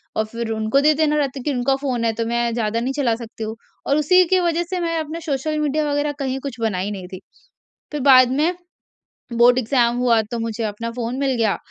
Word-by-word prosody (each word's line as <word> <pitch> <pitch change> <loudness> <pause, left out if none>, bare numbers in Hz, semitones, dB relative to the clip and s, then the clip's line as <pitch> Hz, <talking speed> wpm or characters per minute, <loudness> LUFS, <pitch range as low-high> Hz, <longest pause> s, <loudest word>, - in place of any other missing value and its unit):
और 220 - +1
फिर 230 +1 -5
उनको 220 +4 +1
दे 305 +1 +5
देना 300 0 +1
रहता 280 -2 -1
है 245 - -8
कि 295 - -1
उनका 255 +2 +1
फ़ोन 250 -4 -1
है, 225 - +2
तो 230 +1 -2
मैं 235 0 0
ज़्यादा 225 -1 -1
नहीं 255 +3 -2
चला 255 -6 +1
सकती 230 -1 -8
हूँ 220 +1 -4 0.3
और 280 - +3
उसी 365 +5 +5
की 370 +2 +3
वजह 345 -1 +1
से 370 - -2
मैं 335 -1 -1
अपना 315 +1 -5
सोशल 305 +1 -2
मीडिया 300 0 0
वगैरह 290 +1 0
कहीं 265 -1 -2
कुछ 265 -4 -7
बनाई 205 -3 -1
नहीं 190 -3 -7
थी। 185 0 -9 0.7
फिर 300 - -3
बाद 255 -2 +7
में, 305 +7 +1 0.8
बोर्ड 240 +1 +5
एग्ज़ाम 240 -1 +2
हुआ 235 -3 +3
तो 235 - -2
मुझे 230 0 -3
अपना 220 +2 -4
फ़ोन 240 +1 -4
मिल 270 -2 +1
गया, 225 -3 +1
250 Hz, 230 wpm, -21 LUFS, 230-290 Hz, 0.8 s, बाद